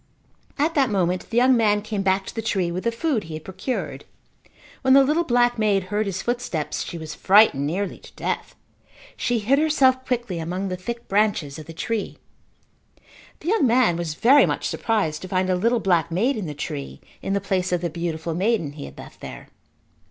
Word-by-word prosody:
At 310 +4 +1
that 275 -5 +3
moment 185 -3 0
the 230 - -2
young 255 +1 +5
man 210 -3 +2
came 215 -2 -3
back 190 0 +1
to - - -7
the 225 - -3
tree 190 -5 0
with 185 +4 -4
the 235 - +2
food 235 - -1
he 160 -1 -7
had 155 - -8
procured. 240 +7 -4 0.8
When 265 0 +5
the 275 - +8
little 305 +5 +2
black 240 -4 +2
maid 205 -3 +2
heard 210 0 +1
his 195 0 -3
footsteps 240 -11 -2
she 170 - -6
was 160 -1 -7
frightened 190 -9 +4
nearly 190 +5 -3
to - - -15
death. - - -4 0.6
She 245 - 0
hid 245 +6 +2
herself 265 -4 +3
quickly 240 -9 -2
among 180 +4 -3
the 185 - -2
thick 235 +6 -6
branches 195 -8 +1
of 155 - -10
the - - -8
tree. 220 +6 -3 1.2
The 330 - -3
young 390 - +3
man 235 -6 +3
was 165 -3 -3
very 270 - +6
much - - -2
surprised 200 -10 -1
to 185 - -6
find 185 0 0
a - - +3
little 230 +6 +2
black 175 -5 +2
maid 225 +11 +1
in 205 -6 -4
the 150 - -6
tree 70 - -6 0.2
in 195 - -2
the 200 - +2
place 185 -2 -1
of 175 -1 +1
the 175 - -1
beautiful 165 -1 -3
maiden 190 -3 0
he 145 -1 -8
had - - -12
left - - -12
there. - - -9
200 Hz, 205 wpm, -23 LUFS, 175-240 Hz, 1.2 s, the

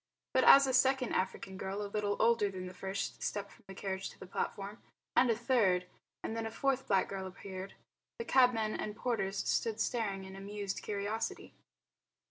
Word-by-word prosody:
But - - +4
as 275 0 +10
a 260 - 0
second 260 0 +3
African 190 0 -2
girl 195 +2 -3
a - - -3
little 205 0 -1
older 230 -3 +4
than 185 -1 -6
the 180 - -7
first 190 +2 -4
stepped 200 -1 -3
from - - -20
the 195 - -9
carriage 190 0 -3
to - - -16
the - - -8
platform, 200 +3 -4 0.3
and 250 - +5
a 230 - +4
third, 215 -8 +3 0.4
and 220 - -3
then 225 0 -2
a - - -3
fourth 270 +3 0
black 195 -2 +3
girl 190 -1 -4
appeared, 190 0 -8 0.4
the 465 - -4
cabmen 245 - +4
and 210 - -4
porters 205 -5 -1
stood 225 -1 0
staring 215 -4 -1
in 190 0 -9
amused 200 0 -4
curiosity. 210 +2 -3
205 Hz, 185 wpm, -33 LUFS, 195-230 Hz, 0.4 s, as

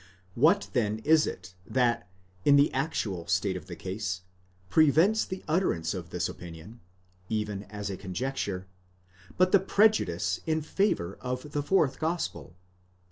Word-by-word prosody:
What 160 - +4
then 110 -4 +1
is 155 0 +5
it 90 - -7
that, 120 -5 0 0.3
in 145 - +6
the 140 +1 +4
actual 110 - -2
state 90 +3 +1
of 90 - -7
the 90 - -7
case, 95 0 -4 0.5
prevents 160 - +4
the 185 -1 -6
utterance 155 - +1
of 90 -4 -6
this 90 +2 -1
opinion, 90 +6 -10 0.5
even 105 -2 -2
as 105 0 -5
a 95 - -5
conjecture, 100 -1 -3 0.7
but 185 0 +4
the 200 - +7
prejudice 175 - +2
in 160 -1 +1
favour 150 - 0
of 125 +3 -4
the 145 - -1
fourth 150 -2 +2
gospel? 160 - -3
115 Hz, 140 wpm, -28 LUFS, -, 0.7 s, the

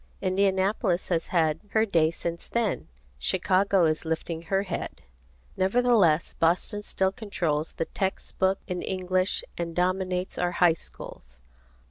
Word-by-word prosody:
Indianapolis 190 0 +1
has 165 -2 0
had 160 -3 +1
her 220 0 +4
day 165 -6 +3
since 170 +1 -5
then, 235 -3 -1 0.3
Chicago 185 - +2
is 155 0 0
lifting 160 0 -3
her 195 +4 0
head. 180 -3 -5 0.5
Nevertheless 190 -5 +3
Boston 175 +5 +1
still 190 -2 0
controls 170 -7 -2
the 165 - -2
text 190 +3 -4
book 190 0 +3
in 180 -2 -3
English 185 0 0 0.2
and 170 -1 -3
dominates 185 0 -1
our 175 0 0
high 175 -1 +5
schools. 65 - -11
185 Hz, 130 wpm, -27 LUFS, 165-195 Hz, 0.5 s, high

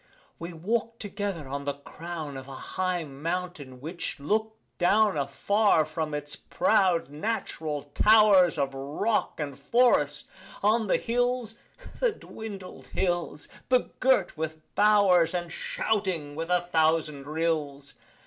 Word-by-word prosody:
We 170 +2 -6
walk'd 225 +7 -2
together 200 -7 -4
on 140 +1 -4
the 140 -1 -1
crown 155 0 -7
Of 130 0 -8
a 135 - -8
high 185 +4 -2
mountain 150 -2 -5
which 160 +3 -5
look'd 220 +9 0 0.2
down 205 +2 +4
Afar 160 +5 +2
from 155 -1 -3
its 145 0 -3
proud 185 - +1
natural 155 -4 -3
towers 205 -5 +6
Of 140 -2 0
rock 145 +14 -1
and 140 -3 -4
forest, 150 - +2 0.4
on 220 +1 +3
the - - +3
hills 245 -1 -1 0.4
The - - +3
dwindled 205 - -9
hills! 175 -5 -2 0.2
begirt 255 -4 +2
with 160 0 -4 0.2
bowers, 200 -5 +4
And 175 -1 -3
shouting 185 -8 -2
with 165 +2 -4
a 180 0 +3
thousand 160 -4 +1
rills. 150 -3 -2
175 Hz, 125 wpm, -27 LUFS, 150-210 Hz, 0.4 s, towers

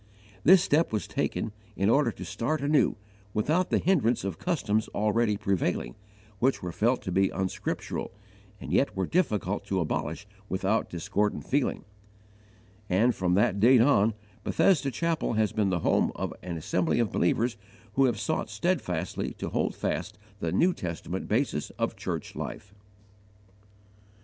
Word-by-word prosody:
This 180 +2 +7
step 160 +3 +2
was 105 -2 -1
taken 110 - -2 0.2
in 100 - +1
order 140 +6 +4
to - - -8
start 145 +6 -2
anew, 145 +1 +3 0.4
without 155 - +1
the - - +3
hindrance 135 -11 +2
of 100 - -4
customs 110 - 0
already 105 0 +2
prevailing, 95 -11 -1 0.5
which 130 -3 +1
were 90 - -3
felt 120 +8 +1
to 95 - -3
be 95 +1 +3
unscriptural 95 -1 -3 0.5
and - - -6
yet - - +2
were 95 - +1
difficult 105 - 0
to 95 - -1
abolish 80 +2 -2 0.2
without 95 +4 0
discordant 100 +4 -1
feeling; 140 0 0 1.0
and, 110 +7 +3
from 90 -3 +1
that 100 0 +2
date 120 +3 +6
on, 115 -5 +4 0.3
Bethesda 155 -3 +3
Chapel 165 +2 -1
has 110 -1 +2
been 105 -2 +1
the 90 -3 0
home - - +2
of - - -3
an 85 -2 -5
assembly 85 +2 0
of 115 -4 +1
believers 115 +7 +1 0.4
who 135 +3 +4
have 120 -5 0
sought 160 +8 -1
steadfastly 95 - -2
to - - -4
hold - - -1
fast 105 +1 -3 0.2
the 85 - -2
New 175 - +3
Testament 90 - -5
basis 110 - 0
of - - -1
church - - -5
life. 100 0 -6
105 Hz, 150 wpm, -28 LUFS, 95-135 Hz, 1.0 s, This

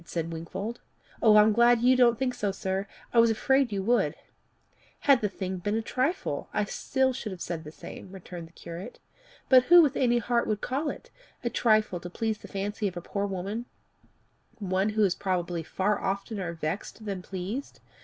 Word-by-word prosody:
said 165 -1 -4
Wingfold. 190 +8 -5 0.4
"I'm 215 -1 +6
glad 235 +1 +5
you 255 +2 +5
don't 240 -2 +5
think 255 +1 0
so, 210 -5 -1
sir. 190 +1 -3 0.3
I 235 - +5
was 230 0 +6
afraid 265 +3 +2
you 195 -1 -2
would." 240 +4 +2 0.9
"Had 275 -4 +5
the 210 - +1
thing 190 0 -4
been 205 +4 -2
a 225 - -1
trifle, 280 - -1
I 210 - +1
should - - -7
still 265 -1 +1
have 190 -4 -5
said 170 -2 -4
the 150 - -9
same," 185 - -10
returned 180 -3 -9
the - - -21
curate. 170 +3 -8 0.5
"But 255 -1 +7
who 350 0 +8
with 285 -3 +1
any 240 -2 +3
heart 235 +1 +1
would 215 -1 0
call 280 +7 -2
it - - -8 0.3
a 235 - -1
trifle 215 -5 +2
to 175 - -8
please 220 +3 -2
the - - -11
fancy 205 +1 -2
of 180 -2 -5
a - - -1
poor 200 +3 -2
woman, 200 +5 -4 0.9
one 190 -1 0
who 215 0 +1
is 190 -3 +3
probably 180 -3 -2
far 190 +5 0
oftener 195 -2 -3
vexed 170 +7 -5
than 195 -3 -3
pleased? 195 +9 -5
205 Hz, 190 wpm, -28 LUFS, 185-235 Hz, 0.9 s, who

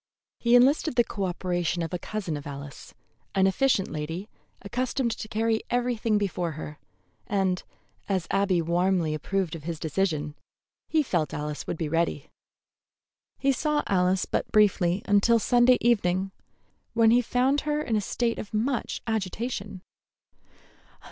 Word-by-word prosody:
He 235 0 +4
enlisted 275 +4 +4
the 240 - +5
coöperation 180 -5 -2
of 165 - -8
a 180 - -2
cousin 190 -5 -4
of 145 -1 -7
Alice, 140 0 -9 0.4
an 190 -1 +4
efficient 195 +1 +2
lady 165 +7 -5 0.3
accustomed 250 +3 -1
to 220 - -5
carry 220 +1 0
everything 240 -3 +1
before 180 -5 -1
her, 150 0 -8 0.5
and, 190 -2 0 0.5
as 190 -3 0
Abby 190 -4 +2
warmly 175 -1 +1
approved 180 +3 -2
of 155 -2 -9
his 165 -2 -4
decision, 155 -3 -1 0.5
he 315 -1 +2
felt 170 - 0
that - - -5
Alice 150 0 -5
would - - -3
be 160 - -2
ready. 165 -2 -1 1.1
He 275 - +2
saw 300 +3 0
Alice 185 -1 +2
but - - -2
briefly 190 -3 +3
until 205 +3 +4
Sunday 245 +3 +4
evening, 195 -5 +2 0.6
when 225 -1 +5
he 245 +1 +5
found 255 +4 +1
her 300 0 -1
in 230 - -1
a 210 - +2
state 230 +3 -1
of 215 - -6
much 245 +4 -1
agitation. 205 -2 -3
195 Hz, 145 wpm, -27 LUFS, 170-235 Hz, 1.1 s, the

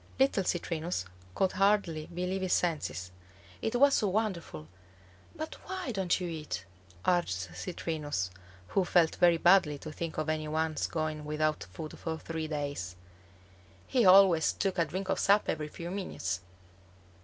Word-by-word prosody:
Little 265 -7 +3
Citrinus 165 - -2 0.3
could 190 - +2
hardly 195 -6 +2
believe 180 +2 -3
his 185 -1 +1
senses. 150 - -1 0.5
It 225 - -1
was 280 +3 +6
so 210 - +3
wonderful. 185 - -2 0.7
"But 315 +1 -6
why 375 -8 -3
don't 190 -5 +1
you 180 - -3
eat," 155 - -5 0.4
urged 175 -1 +3 0.2
Citrinus, 145 - -3 0.4
who 195 - +2
felt 175 -2 +3
very 175 -1 +5
badly 175 -4 +5
to 155 +2 -8
think 165 +1 -5
of 155 0 -1
any 155 -1 -1
one's 155 0 0
going 155 -2 -2
without 150 -2 -1
food 155 - -8
for 160 -1 -3
three 160 0 -4
days. 145 - -3 0.9
He 255 -3 +2
always 185 -4 +7
took 195 -2 -1
a 170 - +4
drink 190 +3 -4
of - - +1
sap 200 +1 +4
every 150 -1 -1
few 170 +3 -7
minutes. 95 - -3
170 Hz, 150 wpm, -31 LUFS, 155-190 Hz, 0.9 s, always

